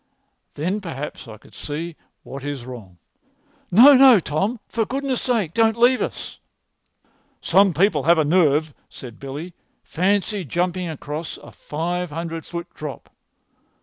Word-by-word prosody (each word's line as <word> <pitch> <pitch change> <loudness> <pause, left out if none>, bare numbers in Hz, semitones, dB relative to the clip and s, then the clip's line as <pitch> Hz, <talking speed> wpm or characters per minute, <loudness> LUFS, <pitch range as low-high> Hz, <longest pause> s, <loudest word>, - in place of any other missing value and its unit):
Then 180 +8 -2
perhaps 150 -7 -7
I 110 -1 -10
could - - -21
see 160 +3 -6 0.3
what 135 +1 -9
is 140 -4 -5
wrong." 110 -8 -10 0.7
"No, 245 +10 +8
no, 260 -4 +8
Tom; 195 +10 -2
for 225 - -1
goodness' 270 +2 -2
sake, 220 -10 0
don't 225 0 +2
leave 245 +2 +4
us!" - - -5 1.0
"Some 195 0 +4
people 170 -1 +2
have 170 +4 +4
a 155 - +2
nerve," 155 -2 +2 0.2
said 120 -3 -11
Billy. 145 +6 -7 0.3
"Fancy 200 +3 0
jumping 175 +3 -2
across 150 +1 -6
a - - -14
five 175 +3 -4
hundred 165 +1 -6
foot 170 -1 -5
drop!" 150 -2 -8
170 Hz, 140 wpm, -22 LUFS, 150-205 Hz, 1.0 s, No